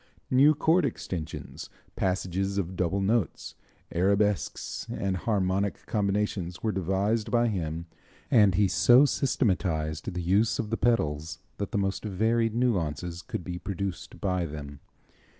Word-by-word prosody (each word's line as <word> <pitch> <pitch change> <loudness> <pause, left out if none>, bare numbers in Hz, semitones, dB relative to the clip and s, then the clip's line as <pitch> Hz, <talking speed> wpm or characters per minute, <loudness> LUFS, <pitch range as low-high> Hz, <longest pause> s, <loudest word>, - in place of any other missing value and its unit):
New 140 +4 +6
chord 165 +4 +3
extensions, 90 - -5 0.3
passages 95 +1 -1
of 95 -1 -2
double 90 +2 0
notes, 100 -3 0 0.4
arabesques 100 +2 0
and 95 -1 -1
harmonic 100 0 -1
combinations 100 -4 -1
were 110 - +1
devised 95 +4 0
by 120 0 +3
him 85 -5 -3 0.5
and 105 -6 +5
he 100 -1 +4
so 125 +8 +6
systematized 90 - 0
the 90 -1 -4
use 100 +6 +2
of 110 -2 -3
the - - +2
pedals 80 -11 0 0.2
that 100 - -3
the - - -1
most 95 -1 -1
varied 110 +2 +1
nuances 90 - -1
could 90 - -5
be 90 0 -5
produced 100 -2 -5
by 90 -2 0
them. 70 -3 -7
95 Hz, 135 wpm, -28 LUFS, 90-110 Hz, 0.5 s, New